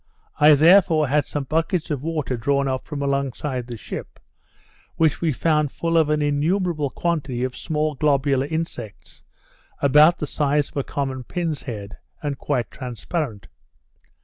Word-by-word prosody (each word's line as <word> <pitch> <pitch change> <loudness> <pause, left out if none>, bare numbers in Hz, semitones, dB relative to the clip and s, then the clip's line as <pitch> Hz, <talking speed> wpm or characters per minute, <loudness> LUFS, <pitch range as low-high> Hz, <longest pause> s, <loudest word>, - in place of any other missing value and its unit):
I 150 0 +8
therefore 160 -1 +5
had 145 0 +2
some 145 - -3
buckets 165 +3 -1
of 140 -4 -2
water 155 -4 -2
drawn 140 +4 0
up 130 -1 -3
from 145 -2 -4
alongside 140 -2 -2
the 120 -2 -6
ship, - - -8 0.8
which 160 -3 +2
we 165 -2 +2
found 150 +1 +1
full 165 0 -2
of 160 -2 +4
an 150 0 +1
innumerable 155 +1 0
quantity 140 -6 -2
of 130 0 -3
small 155 -1 -1
globular 140 -1 +1
insects, 155 -9 -6 0.6
about 150 +5 +6
the - - -3
size 145 0 0
of - - -11
a 140 - +1
common 135 -2 -3
pin's 165 +2 -3
head, 105 -6 -7 0.3
and 145 -2 -3
quite 130 -5 -1
transparent. 125 - -4
145 Hz, 150 wpm, -22 LUFS, 130-155 Hz, 0.8 s, I